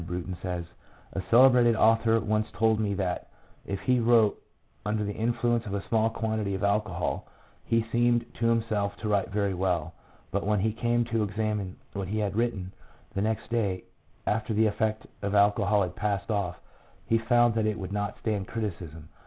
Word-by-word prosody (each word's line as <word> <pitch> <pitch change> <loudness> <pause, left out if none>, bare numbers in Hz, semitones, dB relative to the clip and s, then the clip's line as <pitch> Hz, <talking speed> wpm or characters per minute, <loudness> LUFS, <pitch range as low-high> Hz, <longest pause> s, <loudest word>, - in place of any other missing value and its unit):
Brunton 90 +1 -4
says, 90 -2 -3 0.3
" - - -24
A 95 - -2
celebrated 120 -1 +6
author 115 +1 +4
once 110 0 0
told 110 +3 +2
me 105 -2 0
that 95 -2 -2 0.4
if 100 -1 -3
he 125 -1 +2
wrote 115 -2 +4 0.4
under 105 0 -1
the 105 0 -3
influence 120 +1 0
of 100 - -3
a 100 - -5
small 110 -1 +3
quantity 110 -3 -2
of 95 - -4
alcohol 100 -3 0 0.4
he 115 -1 +1
seemed 120 0 +3
to 115 - +2
himself 110 -3 0
to 110 - -5
write 100 -2 +1
very 100 -1 0
well, 90 -3 -1 0.4
but 100 +2 -1
when 105 -1 +1
he 110 +1 +1
came 120 +1 +1
to 115 -1 0
examine 105 -2 -2 0.2
what 100 -2 -3
he 105 +3 -2
had 105 -2 -1
written, 105 -5 -1 0.4
the 100 - -1
next 110 +2 -2
day, 100 -6 0 0.4
after 110 +1 0
the 110 +1 +4
effect 110 +1 0 0.2
of 100 0 -2
the - - +4
alcohol 100 0 +4
had 90 -1 -4
passed 105 0 -1
off, 100 -4 -1 0.5
he 115 - +2
found 120 +1 +3
that 110 -1 +1
it 105 0 -1
would 95 -1 -5
not 105 0 -2
stand 105 -3 -1
criticism." 85 -8 -5
105 Hz, 185 wpm, -28 LUFS, 100-115 Hz, 0.5 s, celebrated